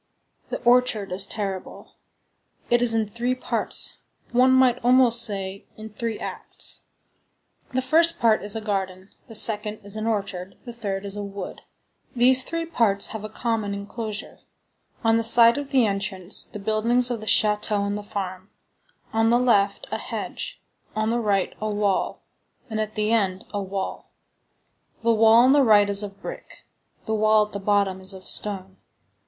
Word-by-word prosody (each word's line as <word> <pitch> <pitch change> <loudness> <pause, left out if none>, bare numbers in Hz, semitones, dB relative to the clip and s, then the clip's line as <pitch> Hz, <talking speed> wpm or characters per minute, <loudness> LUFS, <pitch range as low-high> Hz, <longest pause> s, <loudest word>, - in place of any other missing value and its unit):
The - - -4
orchard 240 -5 +2
is 190 +2 -2
terrible. 195 -3 -6 0.8
It 240 0 +4
is 235 -2 +2
in 220 -1 0
three 240 +4 -2
parts; 255 - -1 0.3
one 250 +2 +4
might 260 -1 +4
almost 245 -1 +5
say, 195 -3 -1
in 220 0 -9
three 225 0 -3
acts. - - -3 0.9
The 260 - +1
first 330 +5 +3
part 225 -2 +3
is 205 +1 -2
a 225 - -3
garden, 190 -2 -4 0.2
the 225 - -8
second 210 0 +4
is 200 +1 -9
an 215 +1 -3
orchard, 195 -4 -3
the 240 - -8
third 200 -4 -4
is 200 0 -4
a 205 - -4
wood. 200 0 -7 0.5
These 255 +1 +4
three 330 0 -3
parts 220 -11 +1
have 220 -2 -6
a 215 - -6
common 220 -4 -2
enclosure: 210 +1 -6 0.6
on 225 0 +3
the 230 - 0
side 235 +3 +6
of 285 -1 -7
the 260 -4 +3
entrance, 195 -2 -2
the - - -10
buildings 230 +4 +1
of 235 - -3
the 215 - -9
château 210 -1 +2
and 200 0 -2
the 210 - -4
farm; 190 -2 -6 0.6
on 225 0 +2
the 240 - +4
left, 205 -5 +2
a - - -2
hedge; - - -4 0.4
on 215 +1 0
the 240 - 0
right, 200 -4 0
a 215 - -2
wall; 205 -2 -1 0.5
and 220 0 -1
at 215 0 -5
the 215 +1 0
end, 195 -3 0
a 205 - -2
wall. 195 0 -5 0.9
The 230 0 +3
wall 220 0 +5
on 260 - +5
the 285 0 +5
right 210 -5 +5
is 200 0 +3
of 200 -1 -7
brick, - - -9 0.4
the 220 - -2
wall 215 0 +3
at 210 - -16
the 200 - -5
bottom 195 -1 0
is 190 +1 -3
of 190 -1 -11
stone. 195 -2 +1
215 Hz, 175 wpm, -24 LUFS, 200-235 Hz, 0.9 s, side